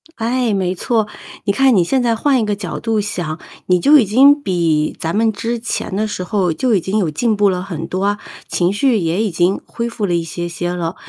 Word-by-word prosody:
哎， 235 0 0
没 185 -2 0
错， 220 +2 0 0.4
你 200 - +1
看 265 +2 +4
你 180 - +4
现 260 +10 +1
在 235 -2 +1
换 265 +3 +2
一 - - 0
个 210 -1 -1
角 195 -4 -5
度 225 -2 0
想， 175 -6 -3 0.3
你 180 -1 +3
就 295 - +6
已 230 - +3
经 275 +8 +5
比 165 - 0
咱 165 +2 -2
们 220 +1 +2
之 230 +3 -3
前 225 -4 -3
的 215 +2 0
时 195 -3 -4
候 185 -2 0
就 245 +9 0
已 195 - +2
经 190 +5 -2
有 185 -6 +1
进 220 +8 0
步 205 -1 +4
了 180 -1 -1
很 165 -4 -5
多 185 +1 -3
啊， 205 0 0 0.3
情 175 +2 0
绪 240 +3 +2
也 170 +1 0
已 215 - 0
经 175 +3 +1
恢 235 0 -4
复 230 -3 -3
了 175 -3 0
一 170 - 0
些 175 +1 -5
些 175 +1 -3
了。 170 0 -3
200 Hz, 260 characters per minute, -18 LUFS, 175-230 Hz, 0.4 s, 就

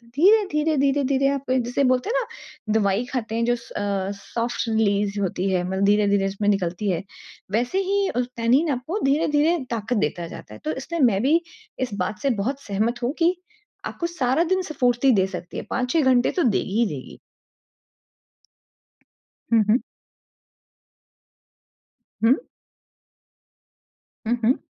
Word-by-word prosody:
धीरे-धीरे, 320 -4 +3
धीरे-धीरे 275 0 +2
आप 275 -2 -2
जिसे 255 +2 +1
बोलते 255 - +2
हैं - - +2
न 215 - -8
दवाई 205 +2 +1
खाते 225 -3 -2
हैं 230 0 +1
जो 240 0 +2
स 235 - -13
अ, 200 -1 -2
सॉफ़्ट 235 +4 -3
रिलीज़ 205 -2 +1
होती 190 0 -1
है, 180 -1 +1
मतलब 190 +1 -1
धीरे-धीरे 205 -1 +3
उसमें 205 +1 -1
निकलती 195 0 0
है। 175 +1 -2 0.5
वैसे 245 - 0
ही 395 +1 +1
अ, 245 - -2 0.2
टैनिन 255 +8 +3
आपको 310 - -3
धीरे-धीरे 300 +3 +2
ताकत 230 +1 -1
देता 170 -1 -1
जाता 105 - -10
है। 110 - -11
तो 155 - 0
इसलिए 335 - -4
मैं 215 -6 +4
भी 320 +5 +4 0.4
इस 250 -5 -2
बात 210 +3 -4
से 275 - +2
बहुत 275 +4 -3
सहमत 220 +5 -1
हूँ 250 +4 0
कि 345 +2 +3 0.5
आपको 340 - -3
सारा 305 -1 +1
दिन 375 - +1
स्फूर्ति 255 -1 +2
दे 190 - +1
सकती 180 -2 -7
है। - - -4
5-6 255 +6 +1
घंटे 245 0 +3
तो 355 - 0
देगी 215 -2 +1
ही 235 - +4
देगी। 130 - -10 2.3
हुँ, 225 -2 +5
हुँ। 235 +5 +4 2.4
हुँ। 235 +3 +6 1.9
हुँ, 240 - +2
हुँ। 250 +4 +2
240 Hz, 150 wpm, -23 LUFS, 205-280 Hz, 2.4 s, हुँ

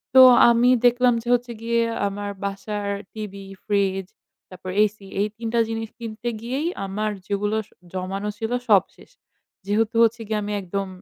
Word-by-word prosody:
তো 260 - +11 0.3
আমি 235 +1 +4 0.2
দেখলাম 245 0 +5
যে, 235 - -13
হচ্ছে 245 0 0
গিয়ে 235 0 +1 0.3
আমার 205 +1 -4
বাসার 200 +1 -3 0.3
টিভি, 200 -2 -7 0.2
fridge 195 -2 0 0.4
তারপর 185 0 -9
AC 215 0 +2 0.2
এই 205 - +2
৩টা 230 0 -1
জিনিস 225 -1 -3
কিনতে 230 +1 -4
গিয়েই 265 +7 -2 0.2
আমার 210 +2 -2 0.2
যেগুলো 205 +1 -1
স - - -29 0.2
জমানো 195 +3 -3
ছিল 225 +1 -3 0.2
সব 200 -3 +6
শেষ। - - -18 0.5
যেহেতু 215 +2 0
হচ্ছে 230 +1 +2
গিয়ে 215 -1 0
আমি 210 0 -3
একদম 195 +2 -3
215 Hz, 160 wpm, -23 LUFS, 200-230 Hz, 0.5 s, তো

